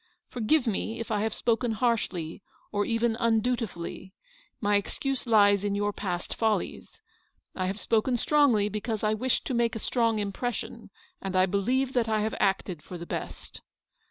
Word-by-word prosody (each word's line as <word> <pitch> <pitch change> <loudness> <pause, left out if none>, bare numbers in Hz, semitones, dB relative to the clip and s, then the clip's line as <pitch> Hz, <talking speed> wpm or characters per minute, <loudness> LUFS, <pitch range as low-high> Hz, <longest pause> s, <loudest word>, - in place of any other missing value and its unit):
" - - -55
Forgive 250 +4 +2
me 225 +1 -2
if 230 - -5
I 210 -1 +1
have 220 +1 0
spoken 230 0 +1
harshly, 205 -8 -1 0.3
or 205 -1 +1
even 230 0 +1
undutifully; 225 -6 -1 0.5
my 205 -1 +2
excuse 265 +6 -1
lies 205 -3 +5
in 205 -1 0
your 205 0 0
past 180 -4 -3
follies. 220 -2 -1 0.5
I 185 -1 -2
have 195 +3 -3
spoken 235 +4 +1
strongly 250 -7 +4
because 215 +1 -3
I 215 0 +3
wished 250 +4 0
to 265 - -2
make 235 -1 +1
a - - -3
strong 230 -1 +1
impression, 210 +4 -4 0.3
and 190 -1 -4
I 185 0 +5
believe 250 +8 0
that 235 -3 +1
I 215 -1 +2
have 220 +1 -1
acted 190 -4 0
for 180 - -8
the 170 - -7
best. - - -6
220 Hz, 170 wpm, -28 LUFS, 200-235 Hz, 0.5 s, lies